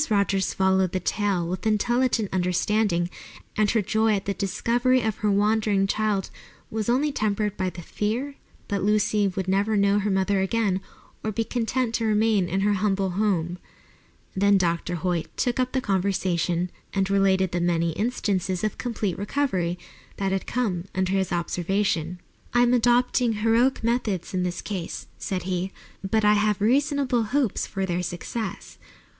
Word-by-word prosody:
Rogers 200 -2 +1
followed 190 -1 +2
the 185 - 0
tale 190 -2 0
with 185 +5 -3
intelligent 230 0 +1
understanding, 180 0 +1 0.5
and 210 -1 +2
her 220 -1 +2
joy 220 +1 +2
at 195 - -3
the 200 - -1
discovery 240 +7 +1
of 220 -2 -1
her 210 - 0
wandering 205 0 +2
child 205 -1 0 0.4
was 220 0 -2
only 280 +5 +2
tempered 210 -4 -1
by 185 -2 -1
the 175 -1 -9
fear 230 - -2 0.4
that 200 -1 -1
Lucy 210 0 +2
would 190 0 -3
never 200 +3 +1
know 200 0 +3
her 205 +1 -1
mother 195 0 +1
again 195 -1 0 0.4
or 220 - -1
be 225 +2 -1
content 240 +1 -1
to 230 - 0
remain 215 -3 +2
in 190 +3 0
her 205 +1 +3
humble 195 -1 0
home. 180 -3 0 0.8
Then 200 +1 +4
Dr. 175 -1 0
Hoyt 175 -1 -1
took 245 0 0
up 255 0 +1
the 260 - 0
conversation 180 -3 0 0.2
and 195 -1 +2
related 190 -2 +2
the 175 - -1
many 170 -1 +1
instances 190 -3 -1
of 215 - -2
complete 215 -7 -2
recovery 195 -7 -1 0.4
that 195 -1 -1
had 190 0 -2
come 195 -8 -1
under 185 0 0
his 195 -1 0
observation. 175 0 -1 0.4
"I 240 - +5
am 245 0 +4
adopting 245 0 +3
heroic 230 +4 +2
methods 225 -7 -1
in 185 - 0
this 180 0 -3
case," 185 -5 -5
said 185 -2 -3
he, 185 +1 -2 0.3
"but 215 +2 +1
I 210 - +6
have 210 -1 +2
reasonable 265 +1 +2
hopes 260 -8 0
of 195 -1 -2
their 175 0 -1
success. 190 +5 -5
200 Hz, 160 wpm, -25 LUFS, 185-220 Hz, 0.8 s, I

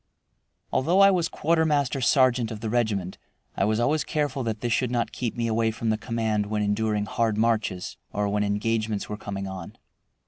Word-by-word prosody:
Although 170 +8 +2
I 195 0 +8
was 175 -3 +1
quartermaster 150 -4 +1
sergeant 125 -2 +3
of 110 -2 -7
the 110 -2 -3
regiment, 105 -6 -1 0.4
I 95 - +1
was 110 +1 +1
always 145 +5 +2
careful 145 -3 -1
that 110 -3 -3
this 120 -1 0
should 125 +1 +1
not 120 -2 -1
keep 120 -3 -3
me 120 - 0
away 115 0 +1
from 110 0 -1
the - - +2
command 110 -2 -1
when 105 0 -1
enduring 105 0 0
hard 110 0 0
marches 110 -5 0
or 105 0 -1
when 105 +1 0
engagements 105 +1 -1
were 105 - -3
coming 100 -2 -5
on. 95 -3 -8
115 Hz, 185 wpm, -26 LUFS, 105-125 Hz, 0.4 s, I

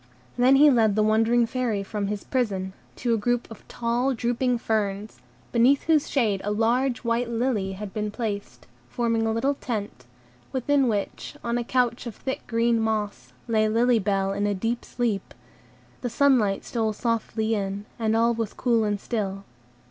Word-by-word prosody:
Then 250 +2 +5
he 290 +2 +7
led 220 -5 +3
the 215 - +3
wondering 225 +2 +3
Fairy 230 -4 -1
from 200 0 -3
his 205 -1 -3
prison, 195 -7 -1 0.2
to 240 -2 0
a 225 - +1
group 240 +3 0
of 225 - -12
tall, 240 +3 0
drooping 245 +1 0
ferns, 205 - -2 0.3
beneath 250 +4 +4
whose 310 -2 +2
shade 215 -8 +1
a 205 - -2
large 235 +4 +1
white 235 0 0
lily 225 -5 -1
had 200 0 -7
been 210 -1 -2
placed, 205 - -5 0.2
forming 230 -2 0
a - - +1
little 265 +6 +1
tent, 210 - -5 0.5
within 270 +1 +2
which, 205 -3 -3
on 235 +1 0
a - - -2
couch 245 0 0
of 225 - -7
thick 265 0 -5
green 230 0 +2
moss, 210 - -2 0.2
lay 215 -1 +2
Lily 235 +2 +3
Bell 195 -1 0
in 205 +1 0
a 205 - 0
deep 230 +5 -2
sleep; 230 -5 -2 0.7
the 245 - -2
sunlight 235 -6 +2
stole 220 -3 -1
softly 225 0 -1
in, 200 -1 -3
and 220 -1 +1
all 230 +1 +3
was 225 -2 -3
cool 235 -3 +1
and 205 -1 -1
still. 195 -3 -3
225 Hz, 170 wpm, -25 LUFS, 205-240 Hz, 0.7 s, he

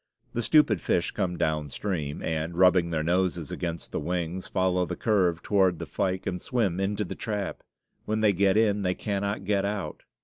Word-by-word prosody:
The 120 - 0
stupid 115 - +4
fish - - +1
come 90 -1 -2
downstream, 75 0 -2
and, 80 +1 -2
rubbing 90 -2 +5
their 80 -2 -1
noses 85 -2 0
against 85 -2 -4
the - - -2
wings, 90 +2 -3
follow 90 -1 +1
the - - -3
curve 90 -6 +1
toward 95 -4 +3
the - - -5
fyke 95 -1 -2
and 90 -1 -3
swim 105 -8 0
into 100 +2 0
the - - -5
trap. 105 -3 -4 0.4
When 110 0 -1
they 105 -2 +4
get 100 +2 +3
in 105 -2 +3
they 90 -1 0
cannot 100 -1 -2
get 100 -1 +1
out. 100 -1 -3
95 Hz, 180 wpm, -27 LUFS, 85-100 Hz, 0.4 s, rubbing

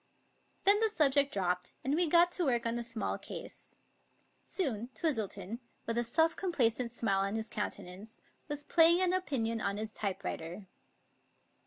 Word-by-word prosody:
Then 405 +1 +6
the 445 0 +2
subject 285 -7 +3
dropped, 180 -2 -1
and 270 - 0
we 340 +2 +5
got 345 +2 +5
to 355 - +1
work 240 -3 +1
on 230 0 -1
a - - -2
small 230 -1 -3
case. - - -8 0.7
Soon 240 - -2
Twistleton, 220 - -2 0.3
with 230 - -2
a 240 - +1
self 320 +8 +2
complacent 250 - +1
smile 220 -5 0
on 195 +2 -1
his 220 0 -4
countenance, 205 +1 -6 0.3
was 295 -1 -4
playing 335 +3 +5
an 365 0 +2
opinion 235 -11 -1
on 200 -1 -1
his 215 +1 -4
typewriter. 190 -2 -4
235 Hz, 155 wpm, -32 LUFS, 210-320 Hz, 0.7 s, Then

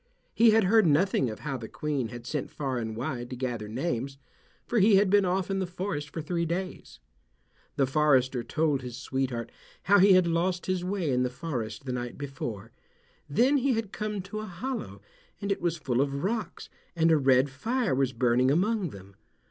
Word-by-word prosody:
He 230 0 +6
had 220 0 +5
heard 210 0 +4
nothing 150 -4 +2
of 110 - -8
how 140 -3 -3
the 115 -2 -7
Queen 145 -3 -2
had 120 0 -9
sent 145 +2 -3
far 135 -4 -3
and 110 -1 -4
wide 120 0 -4
to 130 - -5
gather 120 -4 -3
names, 130 +2 -3 0.5
for 240 - +1
he 205 +1 +6
had 195 -1 +4
been 205 -1 +5
off 185 +1 0
in 195 - 0
the 190 - -1
forest 175 -4 -4
for 160 - -6
three 170 +2 -1
days. 180 +3 -4 0.8
The 135 - +3
forester 130 -3 +2
told 155 -2 0
his 125 -1 -7
sweetheart 130 -3 -3 0.3
how 205 +2 +5
he 195 +1 +7
had 185 -1 +5
lost 175 +2 0
his 185 -1 -1
way 180 -5 -1
in 125 0 +2
the 125 - +1
forest 125 -5 -5
the 130 - -3
night 120 -1 -4
before. 120 -6 -6 0.6
Then 255 - +3
he 270 0 +2
had 225 -3 -2
come 210 -2 -3
to 195 +3 -6
a 215 - -5
hollow, 175 - -5 0.4
and 200 0 -2
it 195 - -1
was 170 -1 0
full 130 -4 0
of 140 +1 -2
rocks, 205 -2 -3 0.3
and 165 0 +3
a 160 - +5
red 135 -1 +3
fire 230 - -1
was 135 0 +1
burning 125 +1 +2
among 190 +5 +1
them. 100 -3 -12
150 Hz, 200 wpm, -28 LUFS, 125-190 Hz, 0.8 s, he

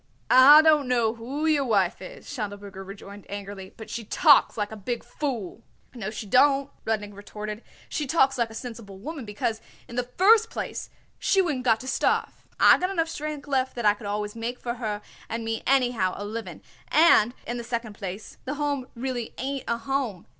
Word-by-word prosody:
"I 285 +5 +9
don't 305 -4 +4
know 235 -3 +2
who 260 +7 -4
your 305 -3 +3
wife 200 -8 +1
is," - - -10
Schindelberger 205 -5 -6
rejoined 200 +1 -11
angrily, 200 -1 -7
"but 220 - -9
she 235 - -4
talks 290 - +5
like 210 -1 -2
a - - -6
big 230 +3 -4
fool." 235 -8 -4 0.3
"No, 220 -5 -5
she 215 0 -6
don't," 275 +5 +4
Rudnik 210 -2 -2
retorted; 210 +1 -7 0.3
"she 295 - -3
talks 270 -2 +3
like 235 -3 0
a 220 - -11
sensible 225 -5 -8
woman, 285 +5 -7
because, 220 +1 -2 0.3
in 235 - -9
the 245 0 -1
first 445 +4 +6
place, - - -5 0.3
she 390 - +2
wouldn't 295 -9 0
got 225 -2 +4
to 260 - -9
starve. 265 - 0
I - - +7
got 365 - 0
enough 335 -4 0
strength 300 -2 -5
left 260 -2 0
that 240 -2 -3
I 205 - +6
could 210 0 -9
always 210 +1 -3
make 235 +2 -4
for 240 - -3
her 210 -2 -3 0.3
and 230 0 -3
me 225 0 -2
anyhow 245 -8 +2
a 205 - -5
living, 225 +2 -6 0.2
and, 260 -7 +5
in 240 - -3
the 235 - -5
second 230 -2 -4
place, 200 0 -7
the 280 +3 -3
Home 285 -3 -2
really 245 -1 -4
ain't 270 +1 -3
a 235 - 0
home. 230 -6 -3
235 Hz, 195 wpm, -26 LUFS, 210-275 Hz, 0.3 s, I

